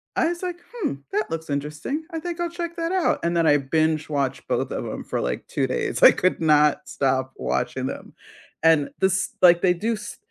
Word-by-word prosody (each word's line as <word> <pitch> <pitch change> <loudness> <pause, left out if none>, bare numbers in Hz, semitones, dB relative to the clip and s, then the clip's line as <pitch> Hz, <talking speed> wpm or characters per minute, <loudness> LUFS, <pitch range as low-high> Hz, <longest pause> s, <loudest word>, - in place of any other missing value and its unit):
I - - +2
was, 345 0 -4
like, 360 -2 -4 0.2
"Hmm, 440 - -2 0.2
that 210 +2 -1
looks 160 -2 -5
interesting, 150 - -3
I 325 - -3
think 345 +1 -5
I'll 345 0 -1
check 340 0 -5
that 330 0 -1
out." 370 -2 +1
And 170 0 0
then 165 - +3
I 145 -2 +5
binge 155 +2 0
watched 140 -3 -2
both - - -1
of - - -3
'em - - -5
for - - -3
like 60 0 -3
2 - - -1
days. - - -2
I - - +10
could 185 -1 0
not 150 -2 +3
stop 130 -1 0
watching 65 +1 -2
them. - - -6 0.5
And 160 -3 +4
this 190 -2 +1
Like 175 -1 +7
they 180 -2 +4
do 220 +7 -1
s 210 -1 -7
170 Hz, 215 wpm, -24 LUFS, -, 0.5 s, I